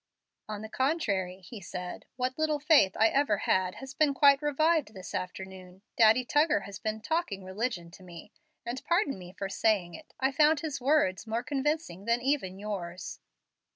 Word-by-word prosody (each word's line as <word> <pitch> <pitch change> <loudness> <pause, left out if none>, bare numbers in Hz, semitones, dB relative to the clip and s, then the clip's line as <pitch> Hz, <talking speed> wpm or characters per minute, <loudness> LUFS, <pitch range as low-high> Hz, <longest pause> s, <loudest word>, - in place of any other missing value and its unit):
"On 210 0 -5
the - - -5
contrary," 200 - -1
he 200 +3 -10
said, 180 0 -7
"what 255 +1 -1
little 310 -1 +1
faith 290 - +4
I 225 +1 +5
ever 275 -6 +2
had 185 -1 +1
has 270 0 -9
been 290 -2 +2
quite 280 0 +6
revived 295 -4 +1
this 185 -1 -9
afternoon. 185 0 -7
Daddy 230 +2 +5
Tuggar 295 +6 +3
has 200 0 -9
been 215 +1 -3
'talking 275 - -2
religion' 190 -3 -3
to 190 - -15
me, 175 +2 -12 0.3
and, 245 +2 -4
pardon 340 - +1
me 180 -1 -10
for 195 +1 -5
saying 195 -3 +1
it, 310 - -13
I 265 +1 +2
found 300 +2 +4
his 290 -5 -4
words 250 -8 +2
more 230 +2 -1
convincing 280 - -2
than 235 +1 +2
even 245 -8 -1
yours." 185 -4 -6
225 Hz, 175 wpm, -29 LUFS, 190-285 Hz, 0.3 s, quite